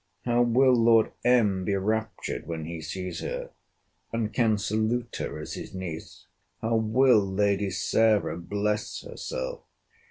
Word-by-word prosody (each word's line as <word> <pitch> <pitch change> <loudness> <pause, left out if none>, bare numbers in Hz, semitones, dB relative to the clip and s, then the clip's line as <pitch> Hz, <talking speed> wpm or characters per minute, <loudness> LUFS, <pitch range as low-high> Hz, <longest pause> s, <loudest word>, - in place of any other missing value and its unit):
'How 120 0 +3
will 125 +2 +4
Lord 115 -2 +4
M. 105 -7 +3
be 100 +2 0
raptured 110 +2 -2
when 80 -2 -4
he 85 0 -6
sees 90 +2 -5
her, - - -5 0.6
and 110 -2 -2
can 110 -3 +3
salute 110 +4 -1
her - - -4
as 75 - -6
his - - -7
niece! 85 -4 -7 0.3
'How 115 +1 0
will 110 +2 +4
Lady 100 +1 +1
Sarah 105 0 +2
bless 105 +4 -2
herself! - - -5
110 Hz, 135 wpm, -27 LUFS, 95-120 Hz, 0.6 s, will